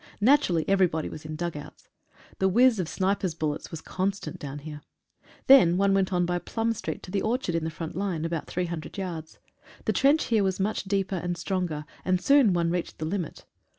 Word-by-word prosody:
Naturally 205 - +3
everybody 185 -5 +2
was 155 +1 -9
in 155 0 -5
dug 170 +1 -3
outs. 145 - -10 0.5
The 190 - +3
whizz 240 +2 +4
of 175 -3 -2
snipers' 190 -3 0
bul 155 -2 0
lets 145 - -7
was 165 - -7
constant 190 -4 -3
down 140 0 -6
here. 150 0 -8 0.6
Then 215 -11 +7
one 195 0 +3
went 195 -1 +2
on 180 -1 +2
by 175 0 -1
Plum 225 +6 -1
street - - -5
to 180 - -9
the 195 0 0
orchard 230 -5 -1
in 165 -1 -1
the - - -1
front 160 0 -6
line, 180 -4 -2
about 165 -1 -3
300 170 -2 -4
yards. 170 -5 -5 0.5
The - - +1
trench 280 0 +3
ihere 220 -2 +4
was 190 -1 0
much 205 +2 -1
'deepeir 195 -1 -1
and 175 0 -3
stronger, 170 -4 -2 0.2
and 185 -1 +1
soon 275 -1 +5
one 170 -1 +1
reached 175 -1 -3
the 155 - -4
limit. 175 -1 -4
180 Hz, 205 wpm, -27 LUFS, 165-200 Hz, 0.6 s, Then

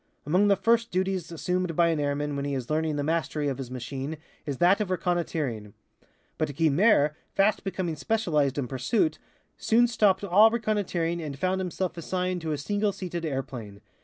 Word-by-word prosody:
Among 180 +8 +3
the 200 - +5
first 230 +2 +2
duties 185 -3 -1
assumed 180 +1 -2
by 170 0 +4
an 160 -2 0
airman 145 0 -1
when 140 - -2
he 140 -1 -2
is 130 +1 -4
learning 155 0 0
the 145 - -1
mastery 155 -1 -1
of 135 -1 -4
his 130 -3 -5
machine 130 +4 -5 0.3
is 140 -2 -2
that 190 - +4
of 205 - -2
reconnoitering. 160 - -2 0.6
But 150 -3 -1
Guynemer, 160 +1 +4 0.2
fast 200 +2 +2
becoming 185 -4 -2
specialized 150 - 0
in 135 -3 -1
pursuit, 135 - 0 0.4
soon 235 +2 +4
stopped 205 -4 +2
all 200 +3 +6
reconnoitering 200 -7 -1
and 145 -3 -5
found 185 +5 0
himself 180 0 -3
assigned 180 +1 -2
to 160 -1 -3
a 150 - -1
single 205 +7 -1
seated 175 -3 -5
airplane. 125 -8 -5
170 Hz, 175 wpm, -27 LUFS, 145-190 Hz, 0.6 s, all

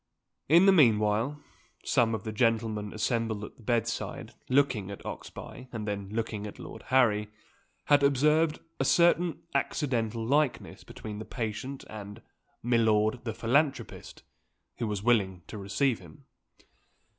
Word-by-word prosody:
In 170 +5 +7
the 195 - +7
meanwhile, 115 - +3 0.5
some 115 -2 +2
of - - -6
the 110 - -4
gentlemen 110 -2 0
assembled 110 -1 -1
at - - -9
the - - -17
bedside, 115 0 -2 0.2
looking 125 -7 +2
at 100 - -9
Oxbye 130 - -8
and 110 -3 -5
then 100 -1 -3
looking 110 -1 -3
at 105 - -10
Lord - - -9
Harry, 110 -5 +3 0.6
had 145 -1 +5
observed 150 +3 +3 0.2
a - - +2
certain 170 +3 +3
accidental 115 -5 -1
likeness 145 +2 0
between 105 -1 -8
the 110 - -6
patient 125 +3 -5
and 105 -1 -9 0.4
"Milord, 110 -1 +2
the 115 - -2
philanthropist," 140 +6 -1 0.6
who 115 - -1
was 105 -2 -3
willing 95 -7 +2
to 105 - -8
receive 115 +6 0
him. 85 -4 -16
115 Hz, 135 wpm, -29 LUFS, 105-135 Hz, 0.6 s, In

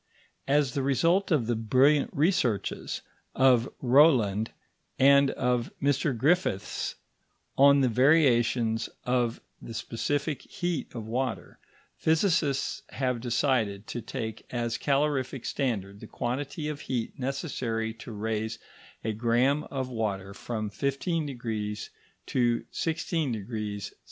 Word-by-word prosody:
As 140 -2 +2
the 140 - 0
result 165 +8 +2
of 150 -9 +2
the 120 +1 0
brilliant 130 +6 +3
researches 145 - 0 0.3
of 130 -2 +4
Rowland 120 -6 +4 0.5
and 140 +1 +6
of 125 -3 0
Mr 140 -1 +1
Griffiths 145 - 0 0.6
on 140 +1 +6
the 130 - +4
variations 120 -4 +3
of 125 -2 0 0.2
the 115 - -8
specific 140 +6 -2
heat 175 -4 -3
of 115 -2 -5
water, 125 +4 -3 0.4
physicists 160 -4 +1
have 125 -3 -1
decided 115 -4 0
to 120 - -4
take 110 -2 -5
as 120 -1 -2
calorific 135 -3 0
standard 100 -7 -2
the 110 - -10
quantity 140 +7 -3
of 150 -2 -4
heat 125 +2 -3
necessary 125 -5 -2
to 115 +1 -10
raise 110 +1 -2 0.5
a 110 - -1
gramme 120 +6 +2
of 130 -2 -3
water 100 -5 -3
from 110 -1 -4
15° 125 - -2 0.4
to 120 -2 +1
16° 115 - -2
C. - - -7
125 Hz, 115 wpm, -28 LUFS, 115-140 Hz, 0.6 s, and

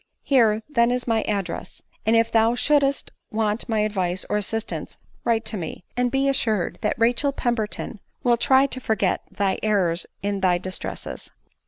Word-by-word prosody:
Here 225 -5 +3
then 235 -5 +3
is 250 0 -1
my 225 -2 +2
address; 195 -5 -3 0.2
and 225 - +5
if 230 0 +3
thou 225 +1 +4
shouldst 280 +1 +2 0.2
want 215 +1 0
my 220 -2 +2
advice 190 -4 -1
or 210 - +2
assistance 220 +2 -3 0.3
write 230 -1 +1
to 215 - 0
me, 170 0 -6
and 250 0 +1
be 270 +2 +1
assured 220 -8 0
that - - 0
Rachel 240 +5 +2
Pemberton 235 -4 -2 0.2
will 240 -1 +4
try 265 +3 +4
to 260 -1 -4
forget 220 -4 +1
thy 195 -2 -1
errors 185 -6 +1 0.2
in 200 0 -1
thy 185 -2 +3
distres&s." 185 +1 -6
225 Hz, 165 wpm, -24 LUFS, 205-245 Hz, 0.3 s, and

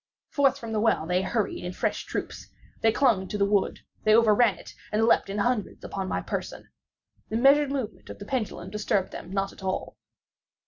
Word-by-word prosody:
Forth 275 -2 +3
from 230 -4 -7
the 220 - 0
well 220 -7 +2
they 180 +2 +1
hurried 205 +1 -2
in 180 +1 -4
fresh - - -2
troops. - - -5 0.3
They 225 - +4
clung 220 -7 +2
to 210 - -3
the 200 - +3
wood—they 205 +1 +1
overran 225 -2 +5
it, - - -12 0.2
and 220 +1 +2
leaped 230 - +3
in 200 - -3
hundreds 225 0 -1
upon 195 -1 -4
my - - -1
person. - - -5 0.6
The 220 - -1
measured 280 +3 +5
movement 250 -7 -4
of - - -8
the 205 - -9
pendulum 215 -7 -3
disturbed 210 -2 0
them - - -8
not 195 +1 -2
at - - -15
all. 190 -1 -3
210 Hz, 190 wpm, -27 LUFS, 195-235 Hz, 0.6 s, overran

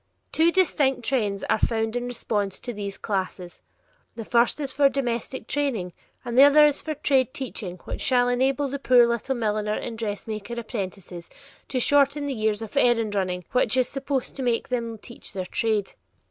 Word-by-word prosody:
Two 330 +2 +3
distinct 290 -9 +2
trends 210 -7 0
are - - +1
found 225 0 0
in 245 0 -2
response 210 -5 -2
to 245 - -6
these 200 -2 -5
classes; 185 -3 -4 0.5
the 225 - -6
first 235 +5 +3
is 280 -3 -2
for 280 0 +4
domestic 245 -2 -3
training, 235 -11 -2 0.3
and 240 - -4
the 260 - +7
other 285 +2 +8
is 295 -1 +2
for 310 -1 -4
trade 265 -3 +1
teaching 210 -9 -5
which - - -6
shall 250 -2 +3
enable 265 +3 +1
the 280 +1 -4
poor 250 -3 +5
little 235 +3 -1
milliner 215 -2 -1
and 225 -2 -5
dressmaker 215 +1 -4
apprentices 190 -6 -6 0.4
to 260 - -1
shorten 285 +2 +3
the 280 - -2
years 215 -2 -1
of 215 - -9
errand 230 -3 +3
running 180 -3 -2
which 250 -1 +2
is 255 - +3
supposed 275 -1 -3
to 270 - -4
teach 240 -2 +1
them 230 -2 -2 0.4
their 185 -1 -3
trade. 215 0 -1
235 Hz, 175 wpm, -25 LUFS, 210-270 Hz, 0.5 s, other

